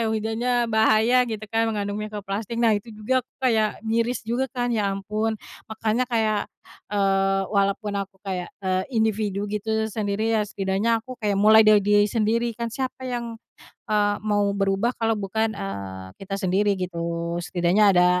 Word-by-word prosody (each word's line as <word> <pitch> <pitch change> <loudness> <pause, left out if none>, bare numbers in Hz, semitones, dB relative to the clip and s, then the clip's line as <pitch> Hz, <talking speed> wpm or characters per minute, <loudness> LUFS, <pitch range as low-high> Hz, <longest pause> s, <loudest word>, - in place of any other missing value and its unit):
hujannya 220 +3 -1 0.2
bahaya 220 +2 +4
gitu 215 -1 -4
kan, 225 0 +2
mengandung 205 -1 -2
mikroplastik. 210 +1 -5
Nah 230 -2 +4
itu 205 +3 -7
juga, 255 +5 +1
aku 250 - -27
kayak 220 -4 +2
miris 230 +2 0
juga 240 +4 0
kan, 245 -1 -1
ya 210 -3 +1
ampun, 215 +3 -2 0.3
makanya 220 +2 0
kayak, 220 -3 +1 0.5
eee, 195 -1 +2
walaupun 200 +1 +1
aku 195 0 -8
kayak, 180 -2 -3 0.2
eee, 185 0 +1
individu 210 -2 0
gitu, 220 +1 -1
sendiri 215 +1 -1
ya 215 - +2
setidaknya 200 +3 0
aku 255 -1 -8
kayak 205 -2 0
mulai 215 +2 +7
dari 215 -1 +6
diri 205 0 +4
sendiri, 230 +1 0
kan 235 -1 -4
siapa 260 +1 -4
yang, 235 -2 -4 0.5
eee, 205 -1 +2
mau 205 -1 +1
berubah 195 +4 +1
kalau 225 0 +1
bukan, 215 +2 -1
eee, 95 -1 -6
kita 195 0 -4
sendiri 195 +1 +1
gitu. 180 -2 -4 0.4
Setidaknya 175 +3 +1
ada, 180 0 +6
215 Hz, 160 wpm, -24 LUFS, 195-225 Hz, 0.5 s, mulai